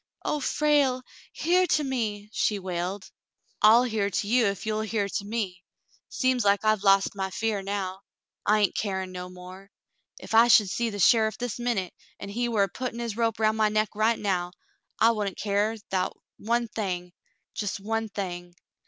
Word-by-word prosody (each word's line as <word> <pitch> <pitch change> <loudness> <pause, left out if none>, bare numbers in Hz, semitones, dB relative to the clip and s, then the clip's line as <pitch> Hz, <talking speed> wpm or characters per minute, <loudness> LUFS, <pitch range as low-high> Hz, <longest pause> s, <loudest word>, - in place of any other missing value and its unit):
*'0h, 300 - -1
Frale! 280 -3 +2 0.3
Hear 360 +3 +2
to 305 -2 +2
me 220 -6 -2
!" - - -29
she 210 - +1
wailed. 185 +1 -4 0.5
"I'll 225 +3 +7
hear 220 -5 0
to 200 +1 -2
you, 235 0 +3
ef 200 +1 -3
you'll 215 0 -1
hear 215 -2 -1
to 200 - -3
me. 200 -5 -3 0.5
Seems 255 -2 +1
like 200 +1 +2
I've 215 -2 +2
lost 195 -1 +4
my 190 -1 -3
fear 215 +1 -1
now. 195 -1 -4 0.4
I 210 0 +3
hain't 205 - +2
carin* 190 -3 -2
no 180 0 -7
more. 185 +2 -12 0.5
Ef - - -8
I 230 +1 +7
should 210 -5 +5
see 235 -1 0
the 205 - -6
sheriff 220 +2 +4
this 245 -2 -4
minute, 230 -7 -1 0.3
an' 200 - -7
he 240 +4 -1
war 215 -4 +2
a - - +1
puttin' 245 +4 -5
his 235 -3 -4
rope 230 -1 0
round 220 0 +2
my 215 -1 +3
neck 215 0 +1
right 220 +2 +2
now, 180 -3 -1 0.5
I 230 - +6
wouldn't 205 -4 -3
care 210 +2 0 0.2
'thout 185 -1 -1 0.2
one 235 +2 0
thing 180 -5 -4 0.2
— - - -49
jes' 205 -1 -3
one 225 +2 -2
thing. 175 -3 -6
210 Hz, 190 wpm, -26 LUFS, 195-230 Hz, 0.5 s, I'll